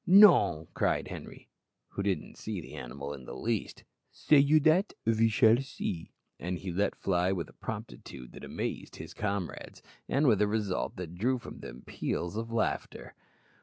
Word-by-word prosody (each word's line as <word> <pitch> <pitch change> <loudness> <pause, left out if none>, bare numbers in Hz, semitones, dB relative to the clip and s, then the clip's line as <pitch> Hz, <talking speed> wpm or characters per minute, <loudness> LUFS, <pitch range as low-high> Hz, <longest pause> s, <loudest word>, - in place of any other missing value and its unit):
"Non!" 180 - +7
cried - - 0
Henri, - - -9 0.4
who - - -4
didn't 100 -2 -2
see 105 -3 -4
the 80 - -10
animal 70 +3 -6
in 65 - -10
the - - -7
least; 115 -3 -2 0.3
"say 150 - +4
you 145 +3 +6
dat? 160 +7 +3
ve 115 0 +4
shall 110 +3 +5
see;" 95 -10 -5 0.3
and 90 +1 -3
he 95 +1 -5
let 100 +4 0
fly 90 -1 +1
with 85 -5 -2
a - - -16
promptitude 60 +1 -7
that - - -11
amazed - - -4
his - - -8
comrades, 100 -4 -4 0.3
and 145 +2 +2
with 110 -6 +4
a 105 - +4
result 105 -3 -1
that 90 -2 -6
drew 125 +9 +1
from 120 - -10
them - - -9
peals 90 +3 -3
of 115 +1 -4
laughter. 115 - -2
100 Hz, 170 wpm, -30 LUFS, 85-115 Hz, 0.4 s, Non